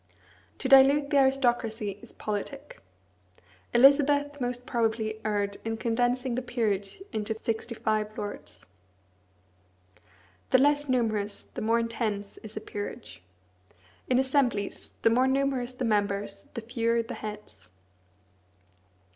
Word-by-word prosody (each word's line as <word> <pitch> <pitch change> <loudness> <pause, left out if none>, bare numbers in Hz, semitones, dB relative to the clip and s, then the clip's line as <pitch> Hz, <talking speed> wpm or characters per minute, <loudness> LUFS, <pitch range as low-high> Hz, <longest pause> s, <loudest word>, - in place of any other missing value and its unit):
To - - -2
dilute 275 +2 +6
the 285 - +5
aristocracy 240 -6 +1
is - - -12
politic. 275 +8 -5 0.9
Elizabeth 285 +2 +4
most 245 0 -3
probably 220 -2 -1
erred 205 -2 -1
in 225 0 -2
condensing 245 +2 0
the 250 - -1
peerage 220 - -2
into 220 0 -2
sixty 225 +1 -3
five 215 -1 -1
lords. 205 0 -7 1.8
The - - +6
less 290 +1 +3
numerous, 215 -5 0
the - - -5
more 230 +2 +2
intense 225 -3 -3
is 215 0 -10
a - - -3
peerage. 205 - -7 0.9
In 250 - +4
assemblies, 260 -6 0
the 225 - +5
more 255 +3 +4
numerous 265 -2 0
the 250 0 -3
members, 200 -2 -1
the 230 - -3
fewer 230 0 0
the 225 - -7
heads. 210 - -9
230 Hz, 120 wpm, -28 LUFS, 215-260 Hz, 1.8 s, dilute